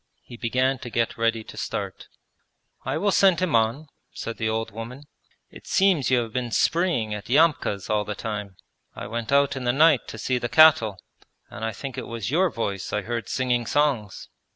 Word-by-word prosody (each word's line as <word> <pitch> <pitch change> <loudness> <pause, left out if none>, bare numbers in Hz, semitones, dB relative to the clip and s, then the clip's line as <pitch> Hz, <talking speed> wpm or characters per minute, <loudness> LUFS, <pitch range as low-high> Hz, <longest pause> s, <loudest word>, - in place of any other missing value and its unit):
He 120 - -11
began 130 +3 0
to 120 - -7
get 115 0 -1
ready 115 -1 0
to - - -12
start. - - -5 0.8
'I - - -1
will 205 0 +1
send 190 -4 +4
him 180 -8 +1
on,' 115 +7 +1 0.3
said 115 - -6
the 110 -1 -1
old 110 0 -2
woman. 115 +6 -8 0.5
'It - - -14
seems 190 -8 +3
you 125 -2 +3
have 115 - -10
been 125 -2 -2
spreeing 155 -5 +1
at 105 +1 -7
Yamka's 140 - +2
all 105 -1 +1
the 105 0 -5
time. 105 -3 -5 0.4
I - - -7
went 115 +1 -4
out 140 0 +3
in 130 - -5
the 120 - +2
night 150 -1 +4
to - - -8
see 125 +3 -1
the 120 - -3
cattle, 130 -11 +6 0.5
and - - -8
I 110 - -1
think 130 +5 -6
it - - -7
was 115 -1 -4
your 180 +4 +3
voice 100 - -4
I 105 - -1
heard 115 -1 -4
singing 125 -2 0
songs.' 135 -9 0
120 Hz, 200 wpm, -24 LUFS, 110-140 Hz, 0.8 s, cattle